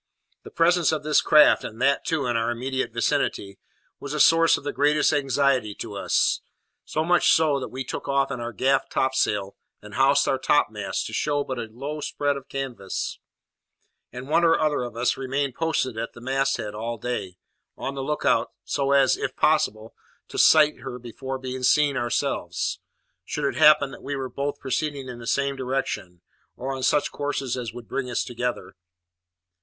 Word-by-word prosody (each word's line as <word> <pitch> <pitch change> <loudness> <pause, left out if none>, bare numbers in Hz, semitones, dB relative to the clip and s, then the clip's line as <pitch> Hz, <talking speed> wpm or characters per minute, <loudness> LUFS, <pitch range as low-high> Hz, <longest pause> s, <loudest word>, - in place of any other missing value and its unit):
The - - -11
presence 170 0 +3
of 155 -2 -2
this 150 0 +3
craft, 150 0 +6
and 110 - -7
that, 135 +2 +2
too, 155 -4 -1
in 120 -1 0
our 115 0 +1
immediate 130 +2 -2
vicinity, 100 -1 -1 0.4
was 140 +1 -5
a - - -2
source 165 +2 +5
of - - -10
the 145 - -3
greatest 150 +2 +3
anxiety 135 -6 +1
to 110 -3 -7
us; 100 - +1 0.4
so 155 - -2
much 175 +2 +4
so, 155 -3 +3
that 130 - -5
we 130 +1 -5
took - - -6
in 140 -1 0
our 120 0 -4
gaff 135 +5 +1
topsail, 105 -7 0 0.2
and 105 0 -13
housed 135 +4 +3
our 135 - +1
topmast, 110 -8 0
to 110 - -7
show 145 +4 0
but 130 -3 -5
a 115 - -4
low 140 +6 -6
spread 145 0 -1
of 135 -1 -9
canvas; 130 -8 -4 0.9
and 125 +1 -8
one 165 +3 +2
or 165 -1 +4
other 150 -3 +1
of 120 -2 -6
us 120 +1 +1
remained 135 0 -2
posted 160 -5 -1
at 115 - -4
the - - -12
mast 135 +2 0
head 105 -3 -5
all 115 +2 -4
day, 105 -6 -4 0.4
on 135 - -4
the 135 - -5
look 150 +3 -3
out, - - +2
so 140 0 0
as, 135 -2 +4
if - - -4
possible, 110 +1 +1 0.4
to - - -4
sight 150 -1 +6
her 130 -2 -7
before 125 +2 -6
being 130 0 -6
seen 145 +2 +3
ourselves, 120 -1 -2 0.4
should 145 +10 -3
it 140 - 0
happen 150 -2 +5
that - - -11
we 140 - -4
were 135 -1 -4
both 145 +2 -3
proceeding 140 0 -3
in 125 -1 -8
the 115 - -9
same 140 +1 0
direction, 125 -9 -4 0.3
or 135 +2 -4
on 130 - -5
such 145 +3 +2
courses 140 -3 -2
as 120 -3 -4
would 120 -1 -10
bring 130 +5 -3
us 120 - -1
together. 120 0 -4
135 Hz, 190 wpm, -24 LUFS, 120-145 Hz, 0.9 s, craft